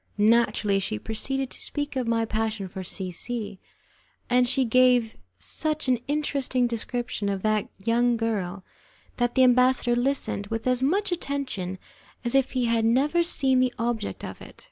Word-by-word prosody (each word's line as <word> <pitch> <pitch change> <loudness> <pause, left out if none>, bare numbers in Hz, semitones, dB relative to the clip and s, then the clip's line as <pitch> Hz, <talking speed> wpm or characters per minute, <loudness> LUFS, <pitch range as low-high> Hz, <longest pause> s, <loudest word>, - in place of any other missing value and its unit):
Naturally, 210 -2 +3
she 150 - -2
proceeded 265 - -2
to - - -3
speak 290 0 -3
of 255 -3 -1
my 230 -1 +1
passion 220 -2 -2
for 190 +1 -7
C 185 0 -4
C, 210 +1 -5 0.7
and 250 0 +4
she 265 0 +2
gave 245 -1 +3 0.2
such 305 - -2
an 250 -2 +2
interesting 280 -4 0
description 235 -2 -3
of 195 -1 -3
that 215 -1 +1
young 235 +3 +1
girl 200 -5 -2 0.5
that 240 0 0
the 260 - +5
ambassador 250 -1 +4
listened 245 -5 -1
with 225 +1 -4
as 250 0 +1
much 375 +9 +1
attention 275 - -3 0.5
as 240 - +1
if 270 -1 +2
he 255 -2 +1
had 230 -1 +1
never 275 +9 +3
seen 270 -6 +2
the 255 -1 +2
object 230 -2 -3
of - - -8
it. - - -13
240 Hz, 165 wpm, -26 LUFS, 215-260 Hz, 0.7 s, the